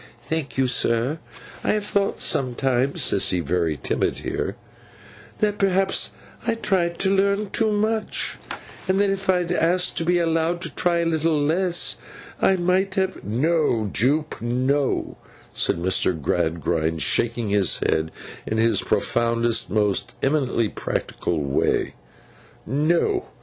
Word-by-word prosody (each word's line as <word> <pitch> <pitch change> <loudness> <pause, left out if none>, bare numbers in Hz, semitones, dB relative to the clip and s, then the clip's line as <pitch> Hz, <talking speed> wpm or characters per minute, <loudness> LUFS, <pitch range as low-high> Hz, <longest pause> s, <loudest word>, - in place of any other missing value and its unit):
'Thank 160 -4 -4
you, 135 - +3
sir. 125 +4 +1 0.4
I - - +2
have 210 -1 -1
thought 200 -1 -1
sometimes;' 130 +3 +1
Sissy 95 -6 +2
very 85 -1 -1
timid - - -1
here; - - -3 0.8
'that 210 -1 0
perhaps 195 0 +2 0.4
I 230 - +2
tried 180 -6 0
to 195 0 +2
learn 200 +1 +1
too 220 -2 +2
much, 215 +1 0 0.5
and 190 +1 +2
that 200 -1 +3
if 195 0 -4
I 185 - +5
had 175 - -5
asked 180 +1 +1
to - - +1
be 175 +1 +2
allowed 165 0 0
to - - -1
try 175 -1 +2
a - - -1
little 160 -1 +1
less, 175 +4 +1 0.4
I 190 - +4
might 185 +2 +1
have—' 190 0 -1
'No, 120 - 0
Jupe, 145 +2 +1
no,' 130 +4 0 0.4
said - - +1
Mr. 90 -1 +1
Gradgrind, 80 +1 0
shaking 115 -2 +1
his 100 -3 +2
head 80 0 0 0.4
in 110 - -1
his 110 -2 +3
profoundest 115 0 +1
and 105 - -2
most 105 -2 0
eminently 135 -5 +1
practical 85 -5 -3
way. 70 0 0 0.7
'No. 170 - +1
155 Hz, 140 wpm, -23 LUFS, 115-185 Hz, 0.8 s, I